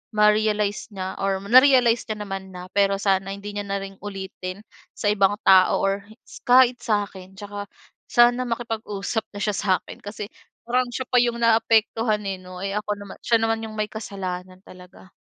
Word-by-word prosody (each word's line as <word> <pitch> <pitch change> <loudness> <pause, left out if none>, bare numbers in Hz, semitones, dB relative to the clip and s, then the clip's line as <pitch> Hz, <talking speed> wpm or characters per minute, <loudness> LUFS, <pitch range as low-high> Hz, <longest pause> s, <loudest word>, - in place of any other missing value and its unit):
ma-realize 210 0 +2
niya 190 -2 -6
or 195 0 -1
na-realize 245 +1 +5
niya 210 -1 -4
naman 195 -1 -7
na. 180 +1 -9
Pero 200 -1 +2
sana 195 -1 0
hindi 205 +1 -8
niya 205 0 -5
na 195 0 -2
rin 195 0 -10
ulitin 190 -1 -7 0.3
sa 205 -1 +1
ibang 200 0 +3
tao 190 -1 +6
or 195 +1 -1 0.2
s - - -13
kahit 250 0 +6
sa 215 -4 +1
akin. 190 0 -13
Tsaka 205 0 -7 0.4
sana 240 +1 +4
makipag-usap 225 -2 -3
na 205 - -7
siya 210 -1 0
sa'kin. 190 -3 -1
Kasi 205 0 -6 0.4
parang 250 +1 +2
siya 260 - -2
pa 250 - +3
'yong 240 -1 +1
naaapektuhan, 225 -1 +2
eh, 190 - -3
'no, 185 0 -10
eh, 195 - -2
ako 210 0 -2
naman 200 -1 -10
siya 235 - +3
naman 225 0 0
'yong 220 - -8
may 210 0 -1
kasalanan 185 -3 -6
talaga. 185 0 -15
205 Hz, 175 wpm, -23 LUFS, 195-225 Hz, 0.4 s, tao